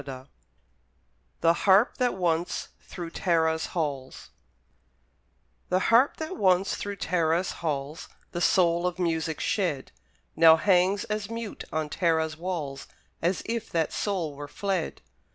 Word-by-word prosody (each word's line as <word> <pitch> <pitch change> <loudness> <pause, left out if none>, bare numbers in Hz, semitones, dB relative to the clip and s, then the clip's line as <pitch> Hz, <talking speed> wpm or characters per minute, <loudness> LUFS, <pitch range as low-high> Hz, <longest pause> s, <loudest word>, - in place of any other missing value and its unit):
Moore 130 -2 -8 1.2
THE 165 0 +5
HARP 195 +6 +4
THAT 250 -4 +1
ONCE 175 -1 -1
THROUGH 175 -2 -7
TARA'S 160 -2 +1
HALLS 140 -6 -4 1.4
The 180 - +3 0.2
harp 250 +5 +5
that 315 +4 -5
once 190 0 +2
through 205 0 -5
Tara's 170 -1 0
halls 150 0 -3 0.2
The 175 - -4
soul 175 -1 +3
of 180 - -3
music 160 -3 -1
shed, 170 -10 -1 0.4
Now 160 -1 +8
hangs 185 +3 +3
as 210 -1 -3
mute 230 -2 -6
on 155 -1 -1
Tara's 160 -1 0
walls 155 -5 -5 0.3
As 175 +3 0
if 230 -1 -3
that 165 -2 -1
soul 180 -7 -2
were 145 +1 -8
fled. 190 +2 -3
170 Hz, 130 wpm, -27 LUFS, 160-195 Hz, 1.4 s, Now